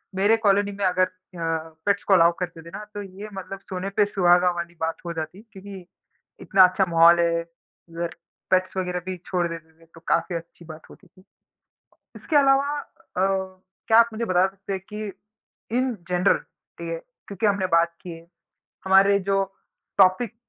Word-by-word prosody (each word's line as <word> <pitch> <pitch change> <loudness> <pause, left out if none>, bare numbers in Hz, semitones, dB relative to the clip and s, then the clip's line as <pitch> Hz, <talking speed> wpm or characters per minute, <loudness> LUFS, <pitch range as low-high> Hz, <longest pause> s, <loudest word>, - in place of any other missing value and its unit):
मेरे 205 +4 +3
कॉलोनी 205 -2 +2
में 200 0 -3
अगर 185 0 +3
अ, - - -11 0.8
पेट्स 200 0 +1
को 200 - +2
अलाउ 170 -2 +6
करते 175 -3 -5
थे 165 - -12
ना 210 - -8
तो 205 - -5
ये 195 +2 -9
मतलब 195 0 -7
सोने 185 +1 -3
पे 210 - +5
सुहागा 180 -2 +3
वाली 170 0 -6
बात 160 0 -1
हो 170 - -3
जाती, 160 +4 -6
क्योंकि 195 -1 -10 0.6
इतना 190 -2 +5
अच्छा 190 +2 +1
माहौल 170 +1 +6
है 170 0 +2 0.5
उधर 170 0 -5 0.4
पेट्स 185 0 +1
वग़ैरह 180 -1 -1
भी 185 -1 -4
छोड़ 175 -2 0
देते 165 -1 -9
थे - - -19
तो - - -12
काफ़ी 170 +1 +1
अच्छी 170 +1 -9
बात 155 -1 -12
होती 195 - -17
थी। 185 +2 -23 0.9
इसके 315 - -4
अलावा 280 +1 +4
अ, - - -9 1.0
क्या 225 -1 +5
आप 235 0 +5
मुझे 230 +2 -3
बता 185 -2 +3
सकते 195 +1 -8
हैं 190 - -4
कि 210 -1 -5 0.7
इन 255 -1 +1
जनरल 180 +2 +3 0.4
ठीक - - -6
है? - - -3 0.3
क्योंकि 200 +2 -1
हमने 200 -2 +1
बात 170 -1 +2
की 180 - -9
है, 165 0 -10 0.6
हमारे 195 +1 +5
जो 195 0 +3 0.6
टॉपिक 195 +4 +4
185 Hz, 180 wpm, -24 LUFS, 170-200 Hz, 1.0 s, अलाउ